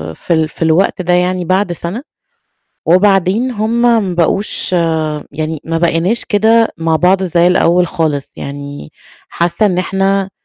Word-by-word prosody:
في 170 - -2
ال 160 -1 +1
في - - -17
الوقت 165 +4 +1
ده 180 0 0
يعني 180 0 0
بعد 185 +1 0
سَنة، 175 +7 -5 0.9
وبعدين 195 +6 +2
هُم 230 +1 -1 0.2
ما 180 -2 -3
بقوش 185 +4 0 0.6
يعني 155 +1 -4
ما 165 0 -2
بقيناش 170 +6 0
كده 225 +2 +3
مع 165 -1 +1
بعض 185 +3 +2
زي 175 -1 +2
الأول 180 0 +3
خالِص 155 -5 -2
يعني. 140 - -8 0.4
حاسّة 175 +5 0
إن 180 -3 0
إحنا 195 +1 0
180 Hz, 145 wpm, -14 LUFS, 165-195 Hz, 0.9 s, كده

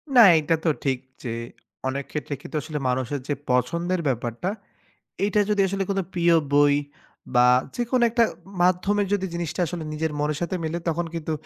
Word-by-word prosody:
না 240 - +10 0.2
এইটা 155 +2 +2
তো - - +4
ঠিক, 135 -2 +1 0.3
যে 120 - -3 0.6
অনেক 140 +1 -2
ক্ষেত্রে 150 -1 -4
কিন্তু 175 - -9
আসলে 155 +1 -5
মানুষের 130 +2 -1
যে 145 - +1 0.2
পছন্দের 170 +9 +1
ব্যাপারটা 120 - -2 0.8
এইটা 210 +1 +2
যদি 205 -1 +2
আসলে 195 0 -1
কোনো 195 -1 +1
প্রিয় 170 -1 +3 0.2
বই 145 0 +5 0.6
বা 125 0 +6 0.3
যেকোন 245 +1 0
একটা 235 0 +4 0.4
মাধ্যমের 195 +3 +2
যদি 190 -2 +1
জিনিসটা 170 0 -3
আসলে 165 -1 -5
নিজের 155 0 -2
মনের 150 0 0
সাথে 180 +2 -1
মিলে 160 +2 -2
তখন 170 +1 0
কিন্তু 160 -1 -3
165 Hz, 170 wpm, -24 LUFS, 145-185 Hz, 0.8 s, না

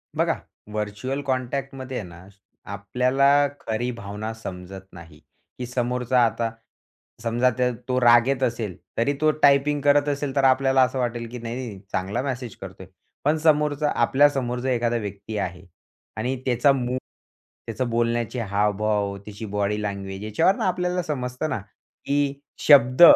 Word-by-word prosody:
बघा, - - +2 0.4
व्हर्चुअल 105 +6 -3
कॉन्टॅक्टमध्ये 130 0 -3
आहे 100 - -7
ना, 85 +2 -13 0.4
आपल्याला 130 +8 +3
खरी 115 +3 -2
भावना 110 -1 -6
समजत 95 -3 -8
नाही. 80 -3 -13 0.4
की 125 - -3
समोरचा, 125 +1 0
आता 115 0 -1 0.7
समजा 120 +2 +2
ते 125 -1 +2 0.2
तो 130 0 +1
रागेत 120 +2 +5
असेल, 115 -6 -1 0.2
तरी 130 +5 +2
तो 155 0 +5
टायपिंग 145 +1 +4
करत 145 +1 +4
असेल, 140 -1 -2
तर 140 - +2
आपल्याला 135 0 +4
असं 130 +1 -1
वाटेल, 120 -1 -2
की 125 - -7
नाही, 115 +1 -5
नाही, 130 -1 -4
नाही, 100 -3 -8
चांगला 100 +7 -1
मेसेज 125 -5 -4
करतोय. - - -9 0.4
पण 150 +2 +3
समोरचा, 150 -1 +2
आपल्या 145 +2 +5
समोर 125 -3 -3
एखादा 120 -2 +1
व्यक्ती 105 0 -5
आहे 90 -1 -4 0.5
आणि 125 +4 -1
त्याचं 130 +2 +4
मूड, 125 -1 -2 0.7
त्याचं 120 +2 -2
बोलण्याचे 120 +1 0
हावभाव, 105 -1 0
त्याची 105 +1 -7
बॉडी 105 0 -1
लँग्वेज, 100 -1 -4
याच्यावरनं 110 - +2
आपल्याला 180 0 0
समजतं 130 0 -3
ना, 110 - -1 0.5
की 140 0 0 0.3
शब्द 130 -1 +6
125 Hz, 145 wpm, -24 LUFS, 105-135 Hz, 0.7 s, शब्द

